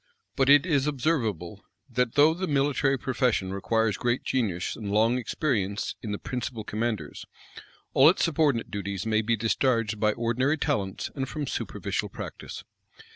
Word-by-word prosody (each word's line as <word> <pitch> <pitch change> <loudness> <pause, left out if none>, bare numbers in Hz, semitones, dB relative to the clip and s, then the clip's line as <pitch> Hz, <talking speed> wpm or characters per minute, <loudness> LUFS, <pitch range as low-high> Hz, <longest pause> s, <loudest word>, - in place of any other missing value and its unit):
But 135 -1 +2
it 145 +2 +7
is 145 -5 +1
observable, 115 - -1 0.2
that 125 -2 -1
though 150 +2 +6
the 185 +3 -3
military 140 -1 +1
profession 120 -7 0
requires 110 +1 0
great 120 +1 0
genius 100 -9 -1
and 105 -2 -5
long 115 +4 +3
experience 105 -6 -1
in 110 - -5
the 105 - -2
principal 125 -2 -5
commanders, 105 -7 -3 0.7
all 135 +4 +7
its 180 - +1
subordinate 150 -7 +1
duties 100 -1 -4
may 110 -1 +2
be 115 +1 +1
discharged 115 -1 0
by 105 0 +2
ordinary 120 +6 0
talents 95 -9 -2
and 135 -2 -3
from 150 -1 -3
superficial - - -3
practice. - - -8
120 Hz, 150 wpm, -27 LUFS, 105-140 Hz, 0.7 s, it